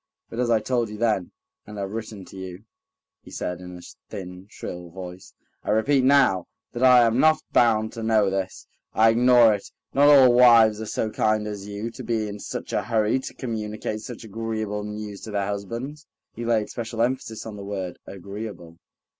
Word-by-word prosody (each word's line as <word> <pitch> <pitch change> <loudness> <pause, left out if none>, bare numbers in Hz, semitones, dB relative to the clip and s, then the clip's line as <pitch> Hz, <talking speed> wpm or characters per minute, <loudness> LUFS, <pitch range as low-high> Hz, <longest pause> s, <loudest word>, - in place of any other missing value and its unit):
"But 115 - -5
as 125 -1 +1
I 115 -2 +4
told 120 0 -1
you 105 - -7
then, 105 -5 0 0.4
and 105 0 -9
have 100 -1 -4
written 110 -3 -6
to 90 - -14
you," 95 0 -8 0.6
he - - -15
said 90 0 -4
in 90 0 -9
a - - -12 0.3
thin, 90 -2 -8
shrill 90 -3 -8
voice, 90 +1 -10 0.3
"I - - -6
repeat 130 +6 +3
now, 130 -10 +4 0.3
that 120 - -5
I 125 -1 +7
am 115 +2 +2
not 155 +1 +4
bound 110 -2 +3
to 115 - -6
know 110 -3 +2
this. 95 -1 -3 0.3
I 110 +1 +6
ignore 120 -1 +6
it. 100 - -5 0.2
Not 140 +1 +5
all 135 -4 +8
wives 115 -3 +6
are 110 - -5
so 110 +1 -2
kind 110 0 +1
as 105 -1 -6
you, 105 +3 -5
to - - -9
be 110 -2 -1
in 105 0 -7
such - - -6
a - - +1
hurry 110 +1 +1
to 130 - -8
communicate 110 -2 -4
such 120 +1 -8
agreeable 110 -1 -4
news 105 -1 -6
to - - -8
their 100 -2 -1
husbands." 115 +9 -5 0.3
He 120 - -6
laid 115 -2 +1
special 115 -1 -2
emphasis 120 -3 -2
on 110 -2 -7
the 100 - -8
word 95 -3 -5
"agreeable." 100 -3 -8
110 Hz, 195 wpm, -24 LUFS, 100-115 Hz, 0.6 s, all